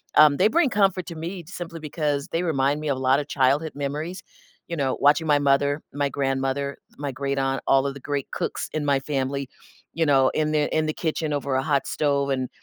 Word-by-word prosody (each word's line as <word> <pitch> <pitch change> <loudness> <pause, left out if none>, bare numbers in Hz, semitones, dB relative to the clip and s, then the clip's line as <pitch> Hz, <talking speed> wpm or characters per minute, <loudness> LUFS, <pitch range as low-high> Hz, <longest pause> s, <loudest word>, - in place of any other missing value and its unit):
um, 150 -2 +7
they 190 - +5
bring 320 +5 +3
comfort 195 -5 +2
to 170 - -6
me 170 +3 -5
simply 170 -2 -7
because 150 -2 -2
they 165 - 0
remind 145 -3 +1
me 155 - -2
of 135 - 0
a - - -5
lot 130 +1 +3
of 145 - -4
childhood 145 +2 +1
memories, 150 +6 -4 0.4
you 170 - -4
know, 135 -4 -1
watching 150 +3 +4
my 145 -1 +5
mother, 140 +1 +2
my 145 -1 0
grandmother, 135 0 -1 0.2
my 145 -1 -3
great-aunt, 135 0 -1
all 135 0 +4
of 135 - -3
the 140 - -10
great 140 +1 -4
cooks - - -3
in 155 -1 -2
my 140 -1 +3
family, 140 -1 -2 0.5
you 165 0 +1
know, 135 -2 +5
in 155 -1 0
the 150 -1 +2
in 155 0 +2
the 155 - -1
kitchen 155 -2 -2
over 140 -2 -1
a 130 - +1
hot 140 -2 +1
stove 140 -2 0
and 130 -1 -1
145 Hz, 220 wpm, -24 LUFS, 140-155 Hz, 0.5 s, um